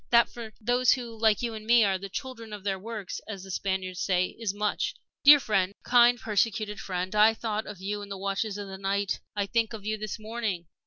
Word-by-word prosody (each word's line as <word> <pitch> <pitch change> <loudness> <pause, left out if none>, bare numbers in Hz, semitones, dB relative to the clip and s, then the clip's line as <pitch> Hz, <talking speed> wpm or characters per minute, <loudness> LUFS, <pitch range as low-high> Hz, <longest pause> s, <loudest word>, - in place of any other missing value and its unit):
That, 235 -1 +5
for 230 -2 -8
those 245 +2 +3
who, 240 -3 -5
like 220 0 +2
you 235 -1 -1
and 215 -1 -7
me, 235 +1 +5
are 195 -2 +1
the 195 +1 -7
'children 230 -1 -6
of 205 -2 -7
their 195 -1 -1
works,' 215 -2 -6
as 200 -4 -6
the 190 - -8
Spaniards 185 -1 -2
say, 180 0 +1
is 225 -4 -1
much. 205 +1 -1 0.3
"Dear 290 +1 +10
friend 195 -5 0
kind, 245 0 +5
persecuted 210 -1 0
friend! 185 0 -3
I 215 +1 +5
thought 220 -1 -3
of 210 -3 -8
you 205 +2 -3
in 200 - -9
the 200 - -5
watches 200 +2 -2
of 205 -1 -6
the 190 0 -8
night 195 0 -1 0.2
I 205 -1 0
think 230 +2 0
of 210 -2 -8
you 215 0 -2
this 215 0 -4
morning. 215 -5 -3
210 Hz, 225 wpm, -28 LUFS, 195-230 Hz, 0.3 s, Dear